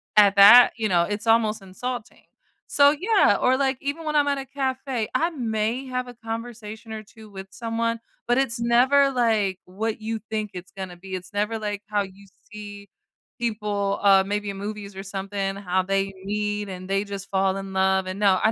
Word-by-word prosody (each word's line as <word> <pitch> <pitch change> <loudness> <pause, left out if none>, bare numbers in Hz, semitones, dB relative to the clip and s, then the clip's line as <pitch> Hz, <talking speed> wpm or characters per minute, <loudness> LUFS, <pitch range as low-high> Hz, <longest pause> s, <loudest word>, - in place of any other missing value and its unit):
at 205 -1 +6
that, 205 +5 +9
you 220 -2 0
know, 175 -2 +3
it's 205 +3 -4
almost 225 -1 +3
insulting. 240 +5 -6 0.4
So, 285 0 +5
yeah, 435 +5 +4
or, 255 +1 +3
like, 270 -1 +1
even 285 +4 -4
when 305 0 -2
I'm 290 -1 +3
at 280 -1 +1
a 270 - -6
cafe, 265 -3 -2
I 330 - +2
may 230 -2 -2
have 250 0 -3
a 245 - -9
conversation 225 -1 -7
or 220 - -5
2 215 +1 -15
with 190 -1 -9
someone, 230 0 -2 0.3
but 245 +1 +2
it's 250 -4 0
never, 255 +4 +4
like, 220 -7 +1
what 215 +4 -4
you 225 +1 -3
think 215 -2 -2
it's 180 -1 -9
gonna 190 -1 -7
be, 190 +1 -7
it's 185 +1 -8
never, 210 +2 -1
like, 205 -1 -4
how 210 -1 0
you 195 +1 -13 0.2
see 205 -1 -9 0.5
people, 210 -3 -1
uh, 195 -1 +6
maybe 205 +1 -2
in - - -8
movies 205 0 -6
or 195 - -6
something, 195 0 -3
how 185 -2 0
they 195 +1 -1
meet 210 0 -2
and 185 0 -8
they 195 +1 +1
just 200 -1 -7
fall 190 0 +1
in 195 0 -7
love, 190 0 +2
and, 185 +1 -5
no, 195 -3 +4
I 220 - +4
210 Hz, 200 wpm, -24 LUFS, 195-235 Hz, 0.5 s, that